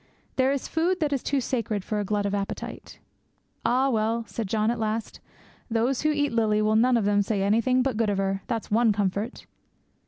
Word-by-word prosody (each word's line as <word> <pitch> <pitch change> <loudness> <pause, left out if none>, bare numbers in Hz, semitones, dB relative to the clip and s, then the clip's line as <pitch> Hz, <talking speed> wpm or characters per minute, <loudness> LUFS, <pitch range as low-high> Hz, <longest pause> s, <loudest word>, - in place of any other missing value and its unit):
There 260 0 +3
is 280 -2 -2
food 350 +3 0
that 300 -3 0
is 270 - 0
too 280 - 0
sacred 225 -5 -2
for 210 +1 -2
a - - 0
glut 205 0 -1
of 200 - -1
appetite. 200 -1 -5 0.7
'Ah, 265 +2 +2
well,' 225 +1 0
said 225 -2 -4
John, 215 +2 +1
at 240 - -3
last, 220 0 -3 0.5
'those 235 +3 +1
who 305 - +2
eat 290 -3 0
Lily 215 -2 +2
will 215 0 +2
none 245 +2 +4
of 220 - 0
them 205 0 +3
say 200 -1 -1
anything 230 +5 +2
but 260 -4 -1
good 225 -2 +1
of 200 - 0
her, 195 0 -1
that's 230 -4 -3
one 225 +1 +4
comfort.' 205 +3 -2
225 Hz, 210 wpm, -26 LUFS, 210-255 Hz, 0.7 s, none